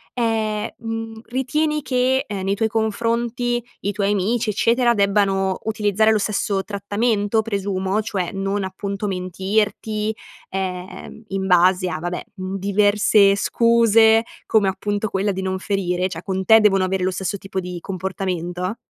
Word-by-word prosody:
ehm, 220 -2 0
mhmm, 225 -1 -5
ritieni 300 +4 -1
che, 260 0 +1
nei 195 -1 -1
tuoi 220 +1 0
confronti 235 +2 -1 0.2
i 200 - -1
tuoi 200 0 0
amici 215 +3 0
eccetera, 235 +3 +3
debbano 195 -2 +1
utilizzare 215 0 +2
lo 215 - +3
stesso 200 -1 -1
trattamento 205 +2 0
presumo, 200 -1 -1
cioè 195 -5 -3
non 195 +1 -2
appunto 200 +2 -4
mentirti, 205 +3 -1 0.3
ehm, 190 +3 -5
in 190 0 -3
base 180 0 +4
a 155 - -3
vabbè, 175 +1 -4
uhm, 190 0 -4
diverse 200 0 +4
scuse, 225 0 +4 0.2
come 210 -3 +3
appunto 205 +2 -2
quella 195 +1 0
di 190 - -4
non 190 0 -2
ferire, 185 -2 -1
cioè 190 - -7
con 190 -1 -3
te 220 -1 +7
devono 195 -3 +4
avere 190 0 -1
lo 185 - +1
stesso 190 +2 -3
tipo 195 0 -5
di 180 -1 -5
comportamento? 185 -1 -3
200 Hz, 145 wpm, -21 LUFS, 190-220 Hz, 0.3 s, te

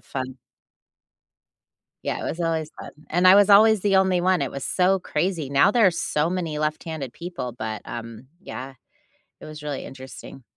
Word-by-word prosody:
fun 130 -1 -6 1.7
Yeah, - - -2
it - - -6
was 165 - -5
always 160 -2 -1
fun, - - -8 0.2
and 175 +3 +3
I 185 - +9
was 205 0 +5
always 215 0 +7
the 195 -1 +2
only 190 -2 +3
one, 185 -3 +2
it 135 - -2
was 140 - -6
so 190 +1 +2
crazy, 175 -5 -2
now 140 +8 +5
there 225 -2 +4
are - - +5
so 155 -2 -1
many 170 -5 -3
left-handed 155 -3 -3
people, 155 -9 -6
but, 110 -2 -5
um, 115 +1 -8
yeah, 135 -7 -8 0.7
it - - -11
was 155 -1 -10
really 145 -2 -4
interesting. 130 0 -11
160 Hz, 175 wpm, -24 LUFS, 135-185 Hz, 1.7 s, I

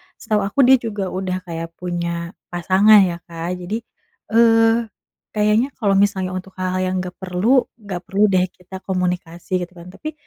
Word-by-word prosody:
setau 215 -2 -1
aku 205 - -4
dia 265 0 +8
juga 210 -4 -4
udah 185 0 -2
kayak 165 -2 -5
punya 170 -1 -3 0.2
pasangan 190 +5 +5
ya 170 - -6
Kak 170 +2 -5
jadi, 180 +4 -4 0.6
eee, 225 0 +4 0.5
kayaknya 210 +4 +3
kalau 210 -5 0
misalnya 190 -2 -1
untuk 185 +1 -9
hal-hal 185 0 -2
yang 185 - -1
nggak 180 0 -7
perlu, 195 +8 +2 0.2
nggak 185 -3 -5
perlu 200 +2 +1
deh 185 0 +3
kita 185 +1 -10
komunikasi 180 -2 -3 0.2
gitu 180 - -26
kan. 175 +1 -11
Tapi, 310 +10 -7
185 Hz, 165 wpm, -20 LUFS, 180-210 Hz, 0.6 s, dia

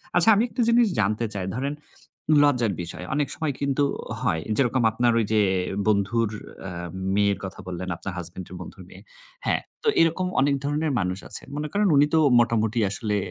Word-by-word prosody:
আচ্ছা 175 +5 +5
আমি 215 - +3
একটা 250 - -2
জিনিস 235 -1 +5
জানতে 110 +3 +1
চাই। 95 -2 -3
ধরেন 140 +3 -2 0.7
লজ্জার 120 -8 +2
বিষয়। 90 +1 -7
অনেক 145 -1 +1
সময় 155 -3 -2
কিন্তু 140 0 +1 0.4
হয়। 80 - 0 0.2
যেরকম 130 -2 +2
আপনার 120 +1 +2
ঐ - - +3
যে 105 - +4 0.5
বন্ধুর 105 +2 +2 0.4
আ - - -5 0.4
মেয়ের 100 -1 +2
কথা 95 - -8
বললেন, 90 0 -5
আপনার 95 +2 -6
হাসব্যান্ড 90 +1 -6
এর - - -7
বন্ধুর - - -10
মেয়ে। - - -13 0.4
হ্যাঁ, - - +1 0.2
তো - - -2
এরকম 165 +3 +2
অনেক 140 0 +3
ধরনের 150 +1 0
মানুষ 90 0 -2
আছেন। - - -6
মনে 150 0 -2
করেন 205 0 +2
উনি 145 +1 +6
তো 160 - +5 0.2
মোটামুটি 115 -1 +1
আসলে 105 +1 -2
115 Hz, 180 wpm, -25 LUFS, 100-145 Hz, 0.7 s, উনি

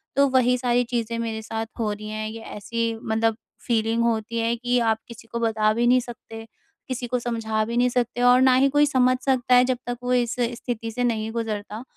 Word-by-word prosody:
तो 280 0 +5
वही 250 -1 +3
सारी 245 0 +1
चीज़ें 230 -1 -3
मेरे 225 -1 -3
साथ 225 0 -4
हो 215 -2 0
रही 210 +1 -6
हैं। 215 0 -4
ये 225 +1 -8
ऐसी 230 +2 -3
मतलब 225 0 +1 0.3
फ़ीलिंग 230 0 +1
होती 230 0 -1
है 230 +1 +1
कि 245 +1 0
आप 225 -2 +2
किसी 230 -1 -12
को 235 - -3
बता 220 -2 +2
भी 235 +2 +1
नहीं 255 +1 +5
सकते। 225 -2 -9 0.4
किसी 250 -1 -4
को 250 +1 0
समझा 225 -2 -1
भी 235 +2 -4
नहीं 250 +1 +3
सकते 245 0 -1
और 245 +1 +6
ना 260 -1 +6
ही 265 +2 +4
कोई 290 +2 +4
समझ 255 -3 +3
सकता 255 -2 +3
है 250 - +6
जब 255 -1 0
तक 245 - -3
वो 250 0 0
इस 240 -2 +1
स्थिति 235 -1 -3
से 245 +3 -2
नहीं 225 -2 -1
गुज़रता। 220 -1 -4
235 Hz, 220 wpm, -24 LUFS, 225-245 Hz, 0.4 s, और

